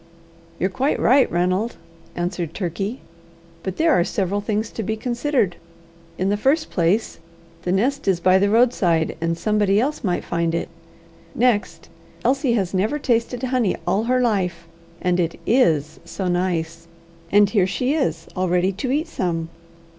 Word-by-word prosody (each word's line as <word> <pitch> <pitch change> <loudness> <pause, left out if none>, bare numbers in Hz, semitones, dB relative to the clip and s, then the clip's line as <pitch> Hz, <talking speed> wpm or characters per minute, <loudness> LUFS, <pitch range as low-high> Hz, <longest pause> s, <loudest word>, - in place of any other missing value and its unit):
"You're 185 +2 0
quite 265 +8 0
right, 265 +2 +4
Ranald," 185 +6 0 0.4
answered 175 -2 -3
Turkey; 195 +6 -3 0.6
"but 190 0 -5
there 325 0 +3
are 175 - +4
several 195 +2 -1
things 215 +1 -2
to - - -4
be 220 +1 -2
considered. 240 -4 0 0.6
In 190 +1 0
the 205 - +1
first 305 +4 +2
place, 185 +5 0 0.4
the 180 - -2
nest 260 +9 0
is 190 -3 +2
by 185 +2 +4
the 200 +1 +2
roadside, 205 -8 +2
and 165 0 0
somebody 210 0 +2
else 280 +4 -1
might 180 -4 0
find 170 -1 -1
it. 170 - -2 0.7
Next, 240 -4 +1 0.4
Elsie 270 -2 +2
has 195 -6 -1
never 210 +10 +1
tasted 245 -2 0
honey 250 -6 +1
all 195 +5 +1
her 255 +1 +2
life, 180 -8 -1 0.3
and 180 0 +1
it 170 -1 -1
is 160 - +2
so 180 +3 -4
nice, 170 -2 -1 0.4
and 205 0 +5
here 195 -5 +3
she 250 +8 0
is, 305 -4 -1
all 185 -1 0
ready 180 +2 +2
to 205 +7 -4
eat 305 +5 0
some. 165 - -2
195 Hz, 160 wpm, -22 LUFS, 175-240 Hz, 0.7 s, and